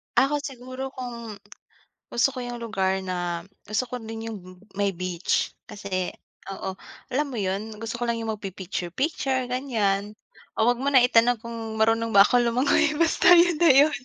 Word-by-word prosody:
Ako 290 Hz, +2 st, +3 dB
siguro 255 Hz, -1 st, -6 dB
kung 235 Hz, -4 st, -6 dB, 0.7 s
gusto 235 Hz, +3 st, +2 dB
ko 255 Hz, -, -7 dB
'yung 245 Hz, -1 st, -5 dB
lugar 190 Hz, -4 st, 0 dB
na 175 Hz, -2 st, -3 dB, 0.2 s
gusto 215 Hz, +4 st, 0 dB
ko 250 Hz, -, -4 dB
din 225 Hz, 0 st, -6 dB
'yung 220 Hz, -, -5 dB, 0.4 s
may 200 Hz, -1 st, +1 dB
beach 180 Hz, 0 st, -1 dB, 0.2 s
kasi 185 Hz, -3 st, -4 dB, 0.4 s
oo 190 Hz, 0 st, -5 dB, 0.3 s
alam 290 Hz, +4 st, 0 dB
mo 265 Hz, -, -7 dB
'yun, 205 Hz, +2 st, -3 dB
gusto 225 Hz, +1 st, -4 dB
ko 240 Hz, -, -1 dB
lang 235 Hz, -, +1 dB
'yung 225 Hz, -1 st, -2 dB
magpi-picture-picture 210 Hz, -, -3 dB
ganiyan. 210 Hz, -6 st, -1 dB, 0.4 s
O 220 Hz, -, +2 dB
huwag 245 Hz, 0 st, +1 dB
mo 275 Hz, -, -2 dB
na 260 Hz, -3 st, +6 dB
itanong 245 Hz, -1 st, +4 dB
kung 230 Hz, -1 st, -6 dB
marunong 225 Hz, +1 st, +2 dB
ba 200 Hz, -, +10 dB
akong 245 Hz, +3 st, +3 dB
lumangoy 280 Hz, +6 st, +2 dB
basta 335 Hz, +3 st, +5 dB
'yun 345 Hz, -1 st, +5 dB
na 340 Hz, -, +6 dB
'yun. 285 Hz, +4 st, +6 dB
230 Hz, 165 wpm, -25 LUFS, 200-255 Hz, 0.7 s, ba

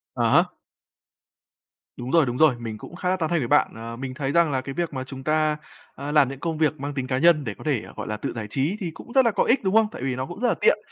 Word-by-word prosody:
À -, -, 0 dB
há. -, -, +2 dB, 1.4 s
Đúng 125 Hz, +1 st, -5 dB
rồi, 165 Hz, -3 st, +5 dB
đúng 125 Hz, 0 st, -3 dB
rồi. 155 Hz, -5 st, +5 dB
Mình 115 Hz, -2 st, -5 dB
cũng 160 Hz, -, -11 dB
khá 180 Hz, +1 st, -2 dB
là 185 Hz, -, +2 dB
tán 160 Hz, -3 st, -1 dB
thành 170 Hz, -, +1 dB
với 125 Hz, -, -2 dB
bạn. 145 Hz, -, +3 dB
Ờ, 115 Hz, +1 st, -7 dB
mình 130 Hz, +1 st, -5 dB
thấy 135 Hz, 0 st, -2 dB
rằng 170 Hz, -1 st, +3 dB
là 130 Hz, -1 st, 0 dB
cái 135 Hz, 0 st, -6 dB
việc 170 Hz, 0 st, -2 dB
mà 130 Hz, -1 st, -3 dB
chúng 130 Hz, 0 st, -9 dB
ta, 155 Hz, 0 st, +1 dB, 0.4 s
a, 140 Hz, +2 st, -5 dB
làm 150 Hz, -4 st, +4 dB
những 135 Hz, -1 st, -7 dB
công 165 Hz, +1 st, -3 dB
việc 155 Hz, -1 st, +1 dB
mang 145 Hz, +1 st, -4 dB
tính 130 Hz, -2 st, -3 dB
cá 130 Hz, -1 st, 0 dB
nhân 160 Hz, 0 st, +4 dB
để 110 Hz, -5 st, -4 dB
có -, -, -11 dB
thể, 145 Hz, -8 st, 0 dB
gọi -, -, -6 dB
là, 105 Hz, -, -3 dB
tự -, -, -4 dB
giải 110 Hz, -3 st, -5 dB
trí 145 Hz, -, -1 dB
thì 180 Hz, -6 st, -3 dB
cũng 235 Hz, +8 st, -12 dB
rất 265 Hz, -2 st, +5 dB
là 230 Hz, -, +4 dB
có 200 Hz, -, +2 dB
ích, 250 Hz, +1 st, +2 dB
đúng 190 Hz, 0 st, 0 dB
không? 225 Hz, -1 st, +5 dB
Tại -, -, -9 dB
vì 130 Hz, -1 st, -1 dB
nó 130 Hz, +1 st, -3 dB
cũng 175 Hz, +7 st, -9 dB
rất 245 Hz, -, +1 dB
là -, -, +3 dB
tiện, 480 Hz, -, +5 dB
145 Hz, 310 wpm, -24 LUFS, 130-170 Hz, 1.4 s, rồi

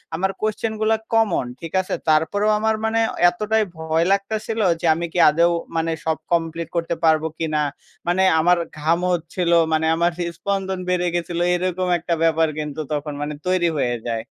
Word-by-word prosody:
আমার 190 Hz, +3 st, 0 dB
কোশ্চেনগুলা 220 Hz, 0 st, 0 dB, 0.2 s
কমন 220 Hz, -, +2 dB, 0.2 s
ঠিক 165 Hz, -, -7 dB
আছে। 185 Hz, -, -6 dB, 0.2 s
তারপরেও 200 Hz, +7 st, +2 dB
আমার 220 Hz, 0 st, +1 dB
মানে 225 Hz, +1 st, +1 dB, 0.3 s
এতটাই 215 Hz, +4 st, 0 dB
ভয় 160 Hz, +1 st, 0 dB
লাগতা 200 Hz, +2 st, +1 dB
ছিলো 225 Hz, -1 st, -1 dB, 0.2 s
যে -, -, -3 dB
আমি 170 Hz, +1 st, -3 dB
কি 180 Hz, -, 0 dB
আদৌ 170 Hz, +3 st, +3 dB, 0.2 s
মানে 165 Hz, 0 st, 0 dB
সব 160 Hz, -1 st, 0 dB
কমপ্লিট 165 Hz, -1 st, -1 dB
করতে 170 Hz, 0 st, -1 dB
পারবো 160 Hz, 0 st, +3 dB
কিনা, 155 Hz, -2 st, 0 dB, 0.5 s
মানে 180 Hz, +2 st, +2 dB, 0.2 s
আমার 175 Hz, +2 st, +4 dB, 0.2 s
ঘাম 165 Hz, +3 st, +2 dB
হচ্ছিলো 170 Hz, +1 st, 0 dB, 0.2 s
মানে 160 Hz, 0 st, +1 dB
আমার 170 Hz, +1 st, +2 dB
হৃদ 170 Hz, -1 st, -2 dB
স্পন্দন 195 Hz, -1 st, -2 dB
বেড়ে 180 Hz, -1 st, +1 dB
গেছিলো 175 Hz, 0 st, -1 dB
এরকম 185 Hz, 0 st, -1 dB
একটা 170 Hz, +1 st, -2 dB
ব্যাপার 165 Hz, 0 st, +3 dB
কিন্তু 150 Hz, 0 st, -5 dB
তখন 150 Hz, 0 st, -3 dB
মানে 150 Hz, +1 st, -3 dB
তৈরি 180 Hz, -2 st, +2 dB
হয়ে 120 Hz, -2 st, 0 dB
যায়। 115 Hz, -1 st, -3 dB
170 Hz, 170 wpm, -21 LUFS, 160-190 Hz, 0.5 s, আমার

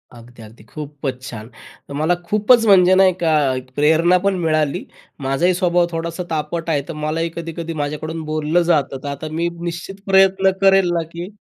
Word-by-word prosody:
अगदी, 120 Hz, 0 st, -15 dB
अगदी. 110 Hz, +2 st, -15 dB
खूपचं 145 Hz, -3 st, -6 dB
छान! 110 Hz, -1 st, -8 dB, 0.4 s
तर -, -, -7 dB
मला 155 Hz, +5 st, +1 dB
खूपचं 220 Hz, +3 st, +3 dB
म्हणजे 185 Hz, -2 st, +6 dB
नाही 190 Hz, -1 st, +5 dB
का, 165 Hz, -, +2 dB, 0.2 s
एक 130 Hz, 0 st, -8 dB
प्रेरणा 160 Hz, +4 st, +4 dB
पण 200 Hz, -1 st, +2 dB
मिळाली. 155 Hz, -3 st, 0 dB, 0.4 s
माझाही 140 Hz, +7 st, +1 dB
स्वभाव 175 Hz, -1 st, +2 dB
थोडासा 165 Hz, +2 st, -4 dB
तापट 165 Hz, +1 st, -3 dB
आहे. 150 Hz, -3 st, +1 dB
तर 165 Hz, -, -5 dB
मलाही 155 Hz, +2 st, -2 dB
कधी-कधी 165 Hz, 0 st, -5 dB
माझ्याकडून 155 Hz, +2 st, -4 dB
बोललं 155 Hz, +2 st, 0 dB
जातं. 150 Hz, -5 st, +1 dB
तर -, -, -5 dB
आता 140 Hz, +2 st, -5 dB
मी 170 Hz, +2 st, -1 dB
निश्चित 175 Hz, +3 st, -5 dB
प्रयत्न 190 Hz, 0 st, +4 dB
करेल 195 Hz, -2 st, +4 dB
ना, 170 Hz, -, 0 dB
की 170 Hz, +2 st, -7 dB
165 Hz, 175 wpm, -19 LUFS, 150-180 Hz, 0.4 s, म्हणजे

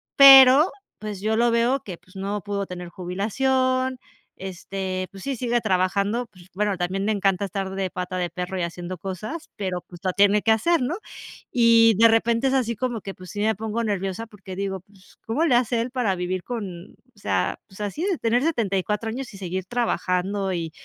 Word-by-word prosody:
pero, 270 Hz, +3 st, +9 dB, 0.3 s
pues, 210 Hz, -3 st, -6 dB
yo 215 Hz, +2 st, +1 dB
lo 240 Hz, 0 st, +3 dB
veo 235 Hz, +4 st, +2 dB
que, 190 Hz, -9 st, -8 dB
pues, 185 Hz, +3 st, -24 dB
no 200 Hz, +2 st, -3 dB
pudo 200 Hz, 0 st, -3 dB
tener 180 Hz, -1 st, -7 dB
jubilación, 255 Hz, +9 st, 0 dB, 0.4 s
este, 190 Hz, 0 st, -5 dB
pues, 195 Hz, -1 st, -11 dB
sí, 275 Hz, -1 st, -2 dB
sigue 240 Hz, 0 st, 0 dB
trabajando, 200 Hz, +3 st, 0 dB
pues, 185 Hz, -5 st, -18 dB
bueno, 205 Hz, 0 st, 0 dB
también 185 Hz, +2 st, -2 dB
le 220 Hz, -, +1 dB
encanta 195 Hz, -2 st, +1 dB
estar 195 Hz, 0 st, -3 dB
de 195 Hz, -1 st, -1 dB
pata 180 Hz, +1 st, -5 dB
de 175 Hz, -1 st, -1 dB
perro 180 Hz, +1 st, -4 dB
y 180 Hz, -, -1 dB
haciendo 175 Hz, +1 st, -5 dB
cosas, 210 Hz, -, -6 dB
pero 185 Hz, -4 st, -3 dB
pues 175 Hz, -2 st, -13 dB
lo 185 Hz, -2 st, -1 dB
tiene 205 Hz, +2 st, +4 dB
que 225 Hz, -, +2 dB
hacer, 335 Hz, +8 st, +2 dB
¿no?, 265 Hz, +7 st, -1 dB, 0.6 s
y 230 Hz, -2 st, +6 dB
de 230 Hz, -, +8 dB
repente 230 Hz, +3 st, +2 dB
es 265 Hz, -, +1 dB
así 240 Hz, -3 st, +1 dB
como 240 Hz, -1 st, -2 dB
que, 195 Hz, -, -7 dB
pues 185 Hz, -1 st, -12 dB
sí 205 Hz, -, -4 dB
me 220 Hz, +1 st, +2 dB
pongo 220 Hz, +3 st, -3 dB
nerviosa 200 Hz, 0 st, -2 dB
porque 195 Hz, -3 st, -10 dB
digo: 195 Hz, 0 st, -3 dB
"Pues, 195 Hz, 0 st, -23 dB
¿cómo 240 Hz, +9 st, 0 dB
le 270 Hz, -7 st, +3 dB
hace 240 Hz, -1 st, +2 dB
él 240 Hz, +2 st, -4 dB
para 240 Hz, -7 st, 0 dB
vivir 180 Hz, 0 st, -3 dB
con 195 Hz, -7 st, -6 dB
o 250 Hz, -5 st, -27 dB
sea, -, -, -1 dB
pues 195 Hz, +1 st, -12 dB
así 210 Hz, -, -3 dB
de 380 Hz, -4 st, 0 dB
tener 235 Hz, 0 st, +1 dB
74 210 Hz, -, -1 dB
años 250 Hz, +2 st, -6 dB
y 195 Hz, -, -10 dB
seguir 185 Hz, 0 st, -4 dB
trabajando 195 Hz, -3 st, -1 dB
y 165 Hz, -2 st, -3 dB
205 Hz, 200 wpm, -24 LUFS, 185-235 Hz, 0.6 s, pero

